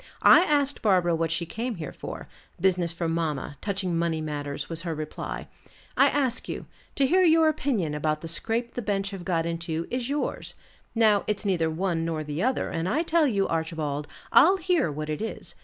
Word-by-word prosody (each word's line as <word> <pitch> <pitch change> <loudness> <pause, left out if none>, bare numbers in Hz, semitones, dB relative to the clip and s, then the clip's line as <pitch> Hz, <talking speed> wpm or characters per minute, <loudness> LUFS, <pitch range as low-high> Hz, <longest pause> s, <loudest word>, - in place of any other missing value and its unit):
I - - +9
asked 290 -5 +1
Barbara 180 -5 +3
what 165 0 0
she 165 +2 -1
came 230 +7 -4
here 155 -5 -6
for; - - -7 0.3
business 180 -2 +2
for 170 0 -3
mamma, 160 -4 -2
touching 190 -4 -2
money 165 -1 0
matters, 145 -2 -4
was 165 0 -1
her 165 -2 -3
reply. 155 0 -5 0.5
I - - +6
ask 260 -4 0
you: - - -5 0.3
to 275 - +3
hear 365 +7 +4
your 325 -2 +5
opinion 260 - 0
about 155 0 -1
the 165 - -6
scrape 225 +8 -2
the 245 - -3
bench 200 -2 -1
have 195 -3 -7
got 170 -3 0
into, 165 -1 -3
is 250 0 -2
yours. 290 +1 -3 0.4
Now, 215 -3 +4
it's 210 0 -2
neither 170 -5 +1
one 165 0 -1
nor 160 -2 -2
the 150 +2 -4
other; 255 +2 0
and 165 +2 -2
I 310 - +1
tell 330 -2 +3
you, 200 -6 +1
Archibald, 160 -3 -2 0.2
I'll 370 +7 +7
hear 350 - +1
what 155 +1 -5
it 155 +3 -3
is. 225 - -5
175 Hz, 195 wpm, -26 LUFS, 160-240 Hz, 0.5 s, I